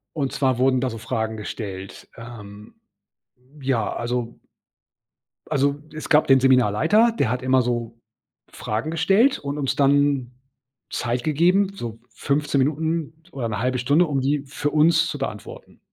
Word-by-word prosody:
Und 140 -3 -2
zwar 130 -3 0
wurden 130 -1 +3
da 130 - 0
so 115 - -6
Fragen 110 -1 -3
gestellt. 100 -3 -7
Ähm, 110 - -11 0.8
ja, 130 -5 -1
also 120 0 -3 1.1
also, 140 +1 +1 0.2
es 155 - -7
gab 150 0 +4
den 135 -1 +5
Seminarleiter. 135 - +4
Der 120 - +1
hat 125 +1 -2
immer 130 0 +3
so 115 -1 -3 0.5
Fragen 110 +9 -4
gestellt 195 - +3
und 145 +1 -5
uns 135 -2 -1
dann 140 -2 +2 0.6
Zeit 120 +1 -2
gegeben, 180 +6 +2
so 115 - -7
15 140 +5 -1
Minuten 160 +2 -1
oder 120 -4 -3
1/2 125 +4 -1
Stunde, 145 +8 +3
um 140 -3 -1
die 140 +2 0
für 145 +1 -3
uns 165 +2 +3
zu 145 - -5
beantworten. 105 -7 -7
135 Hz, 145 wpm, -23 LUFS, 120-150 Hz, 1.1 s, den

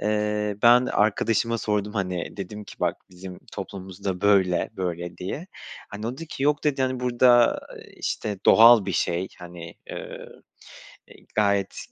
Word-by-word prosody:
Eee, 105 -1 -1
ben 120 +1 +6
arkadaşıma 115 +2 +1
sordum, 105 0 -1
hani, 90 -4 -3
dedim 105 +2 -7
ki - - -12
"Bak, - - 0
bizim 90 0 -10
toplumumuzda 95 -1 -6
böyle 95 -4 +2
böyle." 85 -2 -4
diye. 135 - -5 0.4
Hani, 105 +2 -6
o 120 - -2
dedi 165 +5 -8
ki, 135 - -6
yok 145 +1 +1
dedi, 140 -3 +1
hani, 130 -1 -1
burada, 120 -1 +4 0.2
eee, - - -14
işte, 105 -3 -3
doğal 115 -3 +8
bir 95 - -2
şey, 85 +3 -1
hani, 85 -1 -10 0.2
eee, - - -8 0.8
eee, - - -18
gayet 100 -2 +2
s - - -10
105 Hz, 155 wpm, -24 LUFS, 95-115 Hz, 0.8 s, doğal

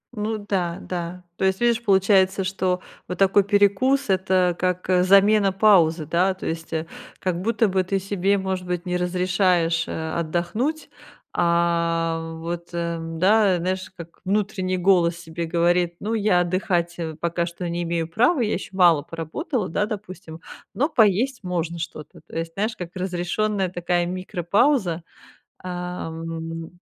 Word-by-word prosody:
Ну 215 +1 -2
да, 190 -5 -2
да. 180 0 -5
То - - 0
есть, 190 0 +1
видишь, 235 -1 +2
получается, 195 -1 +3
что 185 -1 -1 0.3
вот 180 - -5
такой 195 +1 +4
перекус- 205 +7 +2
это 185 -2 +2
как, 180 0 -1
э, 180 -1 +4
замена 200 +1 +5
паузы, 180 -6 +4
да, 180 +5 +1
то 190 - -9
есть, 165 0 -4
э, 160 0 -2 0.3
как 180 -2 -2
будто 225 +2 +2
бы 190 -1 +1
ты 195 +2 -1
себе, 195 +1 0
может 190 -1 -3
быть, 180 0 -3
не 180 -1 -2
разрешаешь, 180 -2 +1
э, 160 0 -4
отдохнуть, 175 - -2 0.5
а 170 -1 +1
вот, 170 +1 -5
э, 170 -1 -2
да, 185 +4 +3
знаешь, 185 +2 -2
как 170 -1 -11
внутренний 195 -2 -1
голос 175 -2 +3
себе 170 0 -5
говорит: 175 +1 +1
"Ну, 215 +2 -3
я 205 -5 +3
отдыхать, 175 -1 0
э, 160 -2 -4
пока 170 +1 -1
что 175 +1 -5
не 170 +1 -2
имею 170 -1 -1
права, 245 - +2
я 220 -2 0
ещё 185 - -4
мало 170 -5 +5
поработала,- 170 - -4
да, 205 +6 0
допустим,- 185 -6 -8 0.3
но 285 +5 +1
поесть 235 - +2
можно 170 -2 -3
что-то". 155 -2 -8
То - - -7
есть, 165 0 -4
знаешь, 215 +4 -2
как 175 0 -7
разрешённая 185 +2 -1
такая 175 0 0
микропауза, 185 - 0 0.6
ам 165 -2 -6
180 Hz, 150 wpm, -23 LUFS, 170-195 Hz, 0.6 s, замена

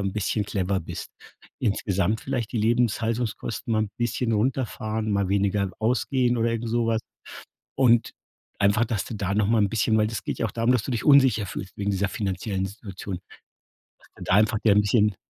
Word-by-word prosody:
'n 100 -1 -2
bisschen 105 0 -1
clever 95 -1 -1
bist. 80 - -7 0.5
Insgesamt 100 -2 0
vielleicht 125 -5 -3
die 120 - -1
Lebenshaltungskosten 115 -1 0
mal 110 - +2
'n 100 - -9
bisschen 120 0 -1
runterfahren, 110 -2 -1
mal 100 -2 +1
weniger 100 -1 +1
ausgehen 125 +2 +1
oder 115 0 +1
irgend 115 0 -2
so 120 0 +1
was. 115 -1 +1 0.8
Und 120 -3 +4 0.5
einfach, 100 +3 +3
dass 110 -4 -2
du 115 - -6
da 100 -2 -2
noch 105 0 +2
mal 115 +2 +3
'n 100 - +2
bisschen 110 0 +1
weil 105 0 +3
das 110 +1 -5
geht - - -3
ja - - 0
auch 105 - -3
darum, 115 +1 +1
dass 120 - +1
du 130 - -4
dich 120 - -2
unsicher 130 -8 +5
fühlst 95 0 -7
wegen 100 0 -2
dieser 100 +1 0
finanziellen 95 0 -2
Situation. 100 -2 -7 0.8
Dass - - -22
du - - -8
da - - +1
einfach 105 +1 +3
dir 105 -3 +4
'n 105 - +6
bisschen 105 -1 +2
110 Hz, 195 wpm, -25 LUFS, 100-115 Hz, 0.8 s, n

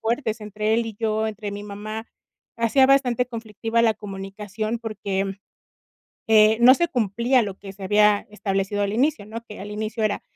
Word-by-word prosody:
fuertes 225 -1 -1
entre 210 +1 -1
él 230 0 +1
y 225 - -6
yo, 220 -1 0
entre 210 -1 -5
mi 205 0 -6
mamá. 215 +2 -6 0.5
Hacía 235 +4 +4
bastante 250 -3 +3
conflictiva 225 -1 -2
la 225 -1 +3
comunicación 205 +2 -5
porque, 205 -4 -3
mm, 195 - -3 1.0
eh, 220 0 +6
no 250 +2 +9
se 340 +5 +1
cumplía 235 +2 +2
lo 200 -3 -5
que 195 -1 -10
se 195 0 -10
había 210 +1 +3
establecido 200 -1 -1
al 200 0 -1
inicio, 240 -2 +1
¿no?, 225 +2 -7
que 210 - -9
al 205 +2 -7
inicio 215 +2 -3
era: 210 -1 0
215 Hz, 180 wpm, -23 LUFS, 205-230 Hz, 1.0 s, no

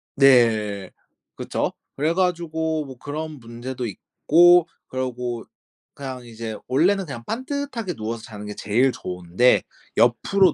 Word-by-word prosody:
네. 110 -8 +4 0.4
그쵸. - - -2 0.2
그래 155 +4 +1
가지고 160 -3 0
뭐 130 -2 -10
그런 150 +2 -5
문제도 120 +2 -6
있고 175 - +4 0.2
그리고 125 -2 -3 0.5
그냥 130 -3 -7
이제 115 -1 -6
원래는 185 +9 +3
그냥 120 -7 -7
반듯하게 255 -5 -3
누워서 110 -1 -5
자는 105 -1 -9
게 105 - -6
제일 120 +6 +2
좋은데 90 +5 +2 0.4
옆으로 150 - +4
130 Hz, 260 characters per minute, -23 LUFS, 115-160 Hz, 0.5 s, 네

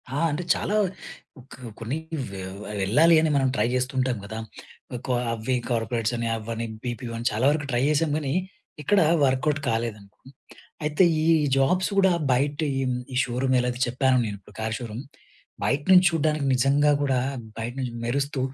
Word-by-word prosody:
ఆ! - - 0
అంటే 150 +4 -3
చాలా 210 - -2 0.8
కొ - - -12 0.2
కొన్ని 120 +6 -3 0.3
వె 95 - -7 0.4
వెళ్ళాలి 150 - +5
అని 160 - +2
మనం 135 -1 +3
ట్రై 120 - +2
చేస్తూ 130 +2 -1
ఉంటాం 130 -2 +1
కదా! 110 +2 -6 0.6
ఒక 120 - -7 0.3
అవి 115 +3 -1
కార్పొరేట్స్ 115 0 -1
అని 115 0 -2
అవనీ 115 +1 -4 0.2
బీపీఓ 120 -1 -5
అని 115 +1 -1
చాలా 110 +5 0
వరకు 150 0 0
ట్రై 120 - +1
చేసాం 155 +1 +2
కానీ, 140 -3 -2 0.5
ఎక్కడ 200 +7 +3 0.3
వర్క్‌ఔట్ 140 +3 +1
కాలేదండి. 115 -3 -3 0.7
అయితే 150 +4 +2 0.2
ఈ - - 0 0.3
జాబ్స్ 180 +8 +2
కూడా 190 -1 +5 0.2
బయట 140 +3 +1 0.2
ఈ - - 0 0.3
ఈ - - -4
షోరూమ్ 130 +2 0
ఎలాగో 125 0 -2
చెప్పానో 130 +1 +2
నేను 105 -2 -4
ఇప్పుడు 100 +1 -19
కార్ 110 0 -2
షోరూమ్. 120 +1 -6 0.6
బయట 140 +2 +1
నుంచి 185 0 +7
చూడడానికి 155 -2 0
నిజంగా 140 +4 +3
కూడా 135 -3 +1 0.4
బయట 115 +1 -4
నుంచి 125 -2 -3
మెరుస్తూ 140 +4 -1
130 Hz, 160 wpm, -25 LUFS, 115-145 Hz, 0.8 s, నుంచి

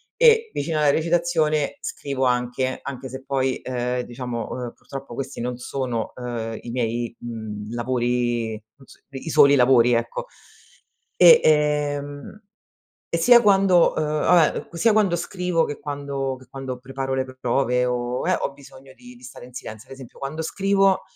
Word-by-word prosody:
e 455 -1 +5
vicina 155 +2 -2
alla 150 -1 +4
recitazione 160 -2 +1
scrivo 140 -2 -3
anche, 125 +1 0
anche 130 -1 -6
se 130 +1 -8
poi, 135 -1 0
ehm, 125 0 -2
diciamo, 120 -1 -5
uhm, 125 -2 -5
purtroppo, 135 -3 -9
questi 135 -1 -5
non 125 0 -3
sono, 125 -2 -3
ehm, 115 -3 -5
i - - -9
miei, 120 -1 -2
mhmm, 110 -2 -7
lavori, 120 -1 -1
mhmm, 110 +5 -14
s - - -19
i 135 +4 -7
soli 140 0 +6
lavori, 125 -2 +5
ecco. - - -2 0.9
E, 480 -1 +8
ehm, 150 +3 0 0.7
e 170 - -1
sia 240 +8 +7
quando, 195 -4 +4
ehm, 155 - +1
vabbè 155 +2 +2
sia 215 +6 +3
quando 200 -5 +2
scrivo 180 -1 -1
che 145 - -5
quando 140 -2 -4
che 130 - -17
quando 130 -2 -6
preparo 135 +1 -4
le 130 0 0 0.2
prove 125 0 +1
o 125 +3 -2
eh, 185 - +3
ho - - -3
bisogno 135 -1 -15
di 245 0 -14
di 245 - -19
stare 125 - -11
in 125 - -16
silenzio, 110 +3 -9
ad 135 - -7
esempio, 130 -3 -13
quando 155 +4 -4
scrivo, 195 +2 +2
135 Hz, 160 wpm, -23 LUFS, 125-155 Hz, 0.9 s, E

